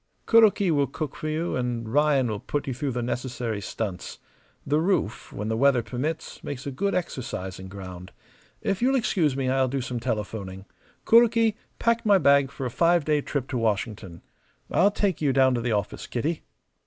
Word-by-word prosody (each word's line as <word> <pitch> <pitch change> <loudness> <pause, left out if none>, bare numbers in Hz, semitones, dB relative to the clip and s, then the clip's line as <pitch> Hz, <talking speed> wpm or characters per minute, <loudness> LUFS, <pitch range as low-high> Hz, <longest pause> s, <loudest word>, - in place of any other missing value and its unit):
"Kuroki 210 -5 +5
will 145 -3 +2
cook 155 -3 -5
for 155 - -4
you 160 +3 -1
and 120 -2 -2
Ryan 145 -3 +3
will 105 -2 -3
put 145 +6 -3
you 135 - -2
through 135 +1 -3
the 120 0 -2
necessary 120 -3 -3
stunts. 100 -3 -5 0.5
The 150 +2 +2
roof, 165 - -1
when 105 - -5
the 110 - 0
weather 130 0 +3
permits, 145 +8 -4
makes 140 -2 -6
a 140 - -3
good 200 +10 -1
exercising 95 - -4
ground. 95 -1 -9 0.5
If 195 +1 -1
you'll 265 +2 +3
excuse 170 - +1
me 135 -1 -1
I'll 130 0 +2
do 135 +2 -2
some 125 -1 -3
telephoning. 105 -5 -4 0.4
Kuroki, 230 -1 +5 0.2
pack 230 0 +1
my 205 -3 +5
bag 140 -4 +4
for 135 -1 -6
a 125 - -3
five 170 +2 +3
day 150 -1 +2
trip 140 -2 -3
to 125 - -1
Washington. 105 -5 -2 0.5
I'll 200 - +4
take 200 -5 -1
you 145 -3 +2
down 130 -1 +4
to 120 - -1
the 115 -1 0
office, 105 -1 -3
Kitty." 150 +7 -2
135 Hz, 185 wpm, -26 LUFS, 115-160 Hz, 0.5 s, Kuroki